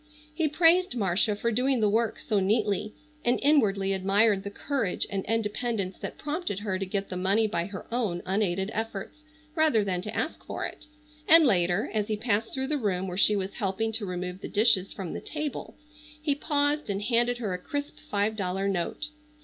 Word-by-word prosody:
He 310 Hz, 0 st, +1 dB
praised 335 Hz, 0 st, +4 dB
Marcia 205 Hz, 0 st, +1 dB
for 235 Hz, +3 st, -1 dB
doing 255 Hz, +3 st, +2 dB
the 215 Hz, -, +3 dB
work 225 Hz, +2 st, +1 dB
so 210 Hz, -, 0 dB
neatly, 210 Hz, +1 st, 0 dB, 0.3 s
and 240 Hz, +1 st, +2 dB
inwardly 200 Hz, -10 st, +3 dB
admired 195 Hz, +2 st, +3 dB
the 200 Hz, -, -4 dB
courage 230 Hz, -2 st, -2 dB
and 195 Hz, -1 st, -2 dB
independence 215 Hz, -3 st, -2 dB
that -, -, -6 dB
prompted 300 Hz, -, -3 dB
her 190 Hz, -3 st, -2 dB
to 195 Hz, -, -2 dB
get 195 Hz, +1 st, -3 dB
the 185 Hz, -, -4 dB
money 195 Hz, +4 st, +3 dB
by 170 Hz, -5 st, -1 dB
her 200 Hz, -2 st, -7 dB
own 220 Hz, -8 st, -1 dB
unaided 190 Hz, 0 st, 0 dB
efforts 225 Hz, +5 st, -4 dB, 0.3 s
rather 310 Hz, -10 st, +3 dB
than 185 Hz, -3 st, -1 dB
to 210 Hz, -, -5 dB
ask -, -, -3 dB
for -, -, -4 dB
it, -, -, -7 dB, 0.4 s
and 325 Hz, 0 st, +8 dB
later, 180 Hz, -3 st, +2 dB
as 210 Hz, -2 st, 0 dB
he 215 Hz, -2 st, -1 dB
passed 220 Hz, 0 st, 0 dB
through 265 Hz, 0 st, -1 dB
the 295 Hz, +1 st, -1 dB
room 190 Hz, -5 st, -1 dB
where 180 Hz, -, -4 dB
she 210 Hz, +2 st, +5 dB
was 195 Hz, 0 st, -3 dB
helping 220 Hz, +1 st, -1 dB
to 220 Hz, -2 st, -3 dB
remove 180 Hz, +1 st, -4 dB
the -, -, -5 dB
dishes 205 Hz, -3 st, +3 dB
from 190 Hz, -5 st, -6 dB
the -, -, -5 dB
table, 300 Hz, -2 st, -5 dB, 0.4 s
he 300 Hz, -1 st, +1 dB
paused 290 Hz, -1 st, 0 dB
and 200 Hz, 0 st, -1 dB
handed 240 Hz, +1 st, +2 dB
her 215 Hz, -6 st, -2 dB
a 180 Hz, -, -3 dB
crisp 285 Hz, +9 st, -5 dB
five 205 Hz, +2 st, +1 dB
dollar 195 Hz, -1 st, -1 dB
note. 195 Hz, -, -2 dB
210 Hz, 195 wpm, -28 LUFS, 195-245 Hz, 0.4 s, and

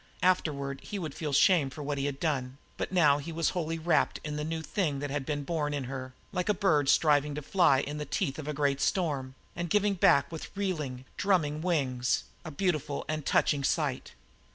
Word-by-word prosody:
Afterward 140 Hz, -7 st, +1 dB
he 205 Hz, -, -6 dB
would 160 Hz, -7 st, -4 dB
feel 150 Hz, -3 st, -4 dB
shame 150 Hz, 0 st, +4 dB
for 145 Hz, +3 st, -8 dB
what 145 Hz, 0 st, -2 dB
he 140 Hz, -, 0 dB
had 140 Hz, -1 st, -4 dB
done, 135 Hz, -5 st, -1 dB, 0.2 s
but -, -, -4 dB
now 150 Hz, -6 st, +4 dB
he 165 Hz, +4 st, -6 dB
was 165 Hz, -1 st, +1 dB
wholly 165 Hz, -2 st, -2 dB
wrapped 165 Hz, +1 st, +1 dB
in 150 Hz, -1 st, -4 dB
the 150 Hz, -, -2 dB
new 160 Hz, +1 st, -3 dB
thing 160 Hz, -4 st, -1 dB
that 140 Hz, 0 st, -4 dB
had 140 Hz, -2 st, -3 dB
been 145 Hz, -2 st, -2 dB
born 150 Hz, -2 st, -1 dB
in 140 Hz, -, -2 dB
her, 130 Hz, 0 st, -6 dB, 0.2 s
like 180 Hz, +1 st, -2 dB
a 210 Hz, -, +3 dB
bird 155 Hz, -8 st, +2 dB
striving 145 Hz, -1 st, +3 dB
to 150 Hz, -, -4 dB
fly 145 Hz, -5 st, +4 dB
in 150 Hz, +1 st, -5 dB
the -, -, -2 dB
teeth 145 Hz, -5 st, -2 dB
of 150 Hz, -, -6 dB
a -, -, -1 dB
great 140 Hz, -1 st, 0 dB
storm, 140 Hz, -8 st, 0 dB, 0.2 s
and 175 Hz, 0 st, -3 dB
giving 205 Hz, +2 st, +3 dB
back 155 Hz, -6 st, +4 dB
with 160 Hz, -, -6 dB
reeling, 150 Hz, -10 st, -3 dB
drumming 160 Hz, -6 st, +1 dB
wings, 135 Hz, -8 st, 0 dB, 0.2 s
a 165 Hz, -, -6 dB
beautiful 155 Hz, -3 st, -1 dB
and 155 Hz, -2 st, -3 dB
touching 145 Hz, -2 st, +2 dB
sight. 145 Hz, -2 st, -1 dB
150 Hz, 210 wpm, -29 LUFS, 140-170 Hz, 0.2 s, shame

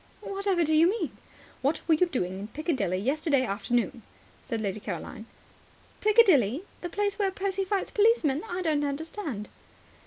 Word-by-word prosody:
"Whatever 395 Hz, -3 st, 0 dB
do 315 Hz, 0 st, +2 dB
you 330 Hz, +3 st, +6 dB
mean?" 385 Hz, -6 st, -1 dB, 0.5 s
"What 280 Hz, +4 st, 0 dB
were 330 Hz, -, +5 dB
you 355 Hz, +4 st, +4 dB
doing 190 Hz, -, -2 dB
in 205 Hz, -, -6 dB
Piccadilly 255 Hz, -, -1 dB
yesterday 275 Hz, -, +1 dB
afternoon?" 235 Hz, +3 st, -1 dB, 0.4 s
said 230 Hz, -3 st, -3 dB
Lady 205 Hz, -1 st, -2 dB
Caroline. 205 Hz, +3 st, -6 dB, 0.7 s
"Piccadilly? 365 Hz, -, +4 dB, 0.2 s
The 350 Hz, -, -4 dB
place 405 Hz, +3 st, -1 dB
where 400 Hz, -2 st, +2 dB
Percy 390 Hz, 0 st, -2 dB
fights 390 Hz, 0 st, -1 dB
policemen? 410 Hz, -, +3 dB
I 360 Hz, +1 st, -2 dB
don't 305 Hz, -3 st, +1 dB
understand." 285 Hz, -, -4 dB
310 Hz, 150 wpm, -28 LUFS, 240-385 Hz, 0.7 s, you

